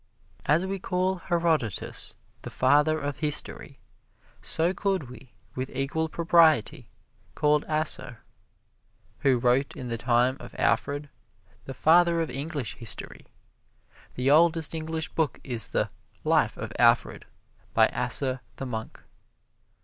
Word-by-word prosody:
As 160 Hz, +5 st, +3 dB
we 195 Hz, 0 st, -3 dB
call 185 Hz, +1 st, -1 dB
Herodotus 165 Hz, -, -1 dB, 0.3 s
the -, -, -7 dB
father 150 Hz, +4 st, +3 dB
of 145 Hz, -2 st, -4 dB
history, 150 Hz, -2 st, -1 dB, 0.6 s
so 165 Hz, +3 st, 0 dB
could 190 Hz, -11 st, -2 dB
we, 125 Hz, -2 st, -14 dB, 0.2 s
with 130 Hz, +1 st, -4 dB
equal 155 Hz, +4 st, -1 dB
propriety, 165 Hz, -6 st, +3 dB, 0.5 s
call 150 Hz, 0 st, +2 dB
Asser, 155 Hz, -6 st, -2 dB, 1.0 s
who 135 Hz, -2 st, +3 dB
wrote 125 Hz, +3 st, +1 dB
in 125 Hz, -2 st, -6 dB
the 115 Hz, -1 st, -3 dB
time 125 Hz, +2 st, +2 dB
of -, -, -11 dB
Alfred, 145 Hz, +1 st, 0 dB, 0.6 s
the 135 Hz, -, -7 dB
father 170 Hz, +4 st, +4 dB
of 160 Hz, -5 st, -2 dB
English 140 Hz, -1 st, -4 dB
history. 115 Hz, -, -6 dB, 0.9 s
The 130 Hz, +2 st, +1 dB
oldest 165 Hz, 0 st, +4 dB
English 160 Hz, 0 st, -4 dB
book 155 Hz, -5 st, -1 dB
is 120 Hz, -5 st, +1 dB
the -, -, 0 dB, 0.4 s
"Life -, -, +2 dB
of -, -, -6 dB
Alfred" -, -, +3 dB, 0.5 s
by -, -, +6 dB
Asser 130 Hz, -2 st, -1 dB
the 135 Hz, -, -6 dB
monk. 110 Hz, -3 st, -6 dB
150 Hz, 125 wpm, -27 LUFS, 130-165 Hz, 1.0 s, by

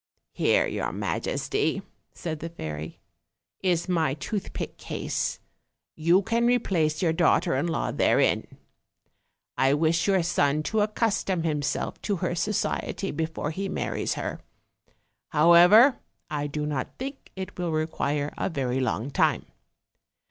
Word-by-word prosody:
"Here, -, -, +3 dB
your -, -, -2 dB
majesty," 415 Hz, +1 st, -1 dB, 0.3 s
said 160 Hz, -3 st, -5 dB
the 165 Hz, -, -5 dB
fairy, 80 Hz, -, -6 dB, 0.6 s
"is 175 Hz, -2 st, +1 dB
my 160 Hz, -6 st, +1 dB
tooth 195 Hz, +7 st, -4 dB
pick -, -, -6 dB
case; -, -, -2 dB, 0.6 s
you 170 Hz, +5 st, +3 dB
nan 235 Hz, +1 st, +3 dB
replace 180 Hz, -10 st, +1 dB
your 165 Hz, -2 st, +3 dB
daughter 170 Hz, 0 st, +3 dB
in 140 Hz, +6 st, 0 dB
law 165 Hz, -, -1 dB
therein: -, -, +2 dB, 1.1 s
I 135 Hz, +1 st, +4 dB
wish 160 Hz, +3 st, +2 dB
your 190 Hz, -3 st, +3 dB
son 150 Hz, -3 st, +1 dB
to 220 Hz, +6 st, 0 dB
accustom 210 Hz, -4 st, 0 dB
himself 150 Hz, -4 st, -2 dB
to 205 Hz, -, -1 dB
her 180 Hz, -1 st, -2 dB
society 195 Hz, +2 st, -1 dB
before 160 Hz, 0 st, -3 dB
he 195 Hz, +4 st, -3 dB
marries -, -, -2 dB
her; -, -, -4 dB, 0.9 s
however, 175 Hz, -, +7 dB, 0.3 s
I 145 Hz, -1 st, -1 dB
do 150 Hz, +1 st, -3 dB
not 145 Hz, -4 st, -3 dB
think 270 Hz, +2 st, -7 dB
it 190 Hz, -1 st, -7 dB
will 175 Hz, -2 st, -1 dB
require 150 Hz, -2 st, -1 dB
a -, -, 0 dB
very 130 Hz, -5 st, -1 dB
long 130 Hz, 0 st, -1 dB
time. -, -, +2 dB
165 Hz, 135 wpm, -26 LUFS, 150-190 Hz, 1.1 s, however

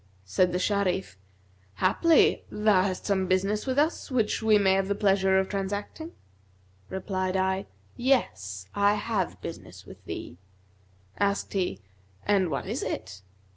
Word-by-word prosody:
Said 180 Hz, -, +2 dB
the 180 Hz, -, 0 dB
Sharif, 190 Hz, -, 0 dB, 0.6 s
'Haply, 315 Hz, -, +3 dB
thou 210 Hz, -3 st, +3 dB
hast 185 Hz, -1 st, -2 dB
some 190 Hz, -2 st, +1 dB
business 195 Hz, +5 st, 0 dB
with 260 Hz, 0 st, -1 dB
us 310 Hz, +3 st, +1 dB
which 230 Hz, -5 st, 0 dB
we 220 Hz, -1 st, +5 dB
may 195 Hz, -2 st, +4 dB
have 195 Hz, +1 st, 0 dB
pleasure 195 Hz, -2 st, +3 dB
of 190 Hz, 0 st, +2 dB
transacting?' 205 Hz, -, -4 dB, 0.8 s
Replied 190 Hz, -1 st, -2 dB
I, 190 Hz, +1 st, 0 dB, 0.3 s
'Yes, 95 Hz, -, 0 dB
I 205 Hz, +1 st, +3 dB
have 205 Hz, -3 st, -2 dB
business -, -, -9 dB
with -, -, -13 dB
thee.' 85 Hz, -, -7 dB, 0.8 s
Asked 200 Hz, 0 st, 0 dB
he, 180 Hz, -, -1 dB, 0.4 s
'And 195 Hz, -4 st, +2 dB
what 140 Hz, -, -3 dB
is -, -, -3 dB
it?' 100 Hz, -, -5 dB
195 Hz, 135 wpm, -27 LUFS, 185-210 Hz, 0.8 s, we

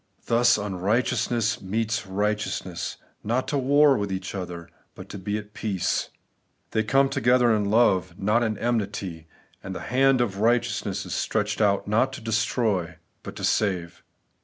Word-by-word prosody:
Thus 120 Hz, 0 st, +4 dB
unrighteousness 105 Hz, +3 st, 0 dB
meets 110 Hz, +2 st, -2 dB
right 105 Hz, +3 st, +1 dB
eousness, 90 Hz, -4 st, -4 dB, 0.3 s
not 120 Hz, +4 st, -1 dB
to 145 Hz, -, 0 dB
war 140 Hz, +2 st, +5 dB
with 100 Hz, -1 st, -3 dB
each 95 Hz, 0 st, -4 dB
other, 90 Hz, -3 st, -6 dB, 0.3 s
but -, -, -11 dB
to 100 Hz, -, -7 dB
be 105 Hz, +3 st, -2 dB
at 105 Hz, 0 st, -9 dB
peace. 100 Hz, -5 st, -1 dB, 0.6 s
They 110 Hz, -, +1 dB
come 135 Hz, +5 st, +3 dB
together 125 Hz, -2 st, +3 dB
in 105 Hz, -1 st, 0 dB
love, 95 Hz, -5 st, +2 dB
not 105 Hz, +4 st, +2 dB
in 110 Hz, -3 st, -1 dB
enmity; 100 Hz, -8 st, -2 dB, 0.3 s
and 95 Hz, -, -7 dB
the -, -, -4 dB
hand 135 Hz, +1 st, +3 dB
of 100 Hz, -5 st, -1 dB
righteousness 110 Hz, -4 st, 0 dB
is 90 Hz, -, -5 dB
stretched 105 Hz, -1 st, -1 dB
out 100 Hz, -2 st, +2 dB
not 115 Hz, +6 st, +2 dB
to -, -, -6 dB
destroy, 110 Hz, -5 st, 0 dB, 0.3 s
but -, -, -9 dB
to -, -, -8 dB
save. 90 Hz, -5 st, 0 dB
105 Hz, 160 wpm, -25 LUFS, 95-120 Hz, 0.6 s, war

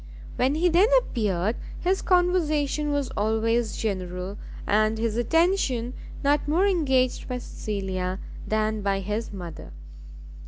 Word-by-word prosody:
When 260 Hz, +3 st, +2 dB
he 340 Hz, +3 st, +3 dB
then 355 Hz, +5 st, +5 dB
appeared, 210 Hz, -, -1 dB, 0.2 s
his 375 Hz, +2 st, +1 dB
conversation 310 Hz, -5 st, +2 dB
was 285 Hz, -2 st, -1 dB
always 225 Hz, +2 st, 0 dB
general, 185 Hz, -1 st, -3 dB, 0.3 s
and 215 Hz, +1 st, +2 dB
his 225 Hz, -1 st, -1 dB
attention 255 Hz, -, +1 dB, 0.3 s
not 290 Hz, +1 st, +2 dB
more 335 Hz, +6 st, +3 dB
engaged 265 Hz, -10 st, +1 dB
by 250 Hz, -, -2 dB
Cecilia 190 Hz, -5 st, -3 dB, 0.3 s
than 215 Hz, 0 st, 0 dB
by 195 Hz, -1 st, 0 dB
his 210 Hz, +4 st, -3 dB
mother. 175 Hz, -, -8 dB
230 Hz, 120 wpm, -26 LUFS, 205-300 Hz, 0.3 s, then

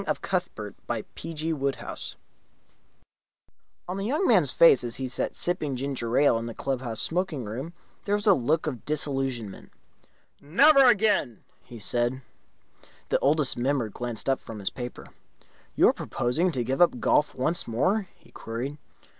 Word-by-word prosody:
8 -, -, -10 dB
The -, -, 0 dB, 0.7 s
Heel 165 Hz, 0 st, -3 dB
of 140 Hz, -2 st, -1 dB
Achilles 135 Hz, -, -4 dB, 1.7 s
On 180 Hz, +2 st, -4 dB
the 195 Hz, -, -3 dB
young 300 Hz, +10 st, 0 dB
man's 180 Hz, -, +4 dB
face, 135 Hz, -3 st, +6 dB
as 120 Hz, -1 st, -4 dB
he 130 Hz, -, -3 dB
sat 125 Hz, -, -3 dB
sipping 160 Hz, -5 st, 0 dB
his 125 Hz, -, -4 dB
ginger 125 Hz, -4 st, -2 dB
ale 140 Hz, -5 st, +4 dB
in 115 Hz, -, -5 dB
the 115 Hz, -, -7 dB
club 135 Hz, -2 st, -2 dB
house 115 Hz, -4 st, -4 dB
smoking 175 Hz, -6 st, -2 dB
room, 130 Hz, +11 st, -6 dB, 0.3 s
there 205 Hz, -, +1 dB
was 205 Hz, +1 st, -3 dB
a 205 Hz, -, +7 dB
look 155 Hz, +3 st, 0 dB
of 130 Hz, -7 st, -4 dB
disillusionment. 135 Hz, -8 st, -2 dB, 0.7 s
"Never 275 Hz, -, +6 dB
again!" 210 Hz, -, +2 dB, 0.2 s
he 120 Hz, -, -12 dB
said. 120 Hz, +4 st, -1 dB, 0.9 s
The -, -, +2 dB
Oldest 145 Hz, 0 st, +2 dB
Member 125 Hz, -2 st, 0 dB
glanced 120 Hz, +2 st, -3 dB
up 135 Hz, -1 st, +2 dB
from 110 Hz, -, -9 dB
his 100 Hz, -2 st, -2 dB
paper. 125 Hz, -1 st, -7 dB, 0.7 s
"You -, -, +6 dB
are -, -, +2 dB
proposing 160 Hz, +10 st, -1 dB
to 125 Hz, -3 st, 0 dB
give 130 Hz, +7 st, -1 dB
up 170 Hz, -8 st, +4 dB
golf 150 Hz, -, +2 dB
once 155 Hz, +7 st, 0 dB
more?" 185 Hz, -, 0 dB
he -, -, -23 dB
queried. 130 Hz, +6 st, -6 dB
135 Hz, 165 wpm, -26 LUFS, 120-170 Hz, 1.7 s, a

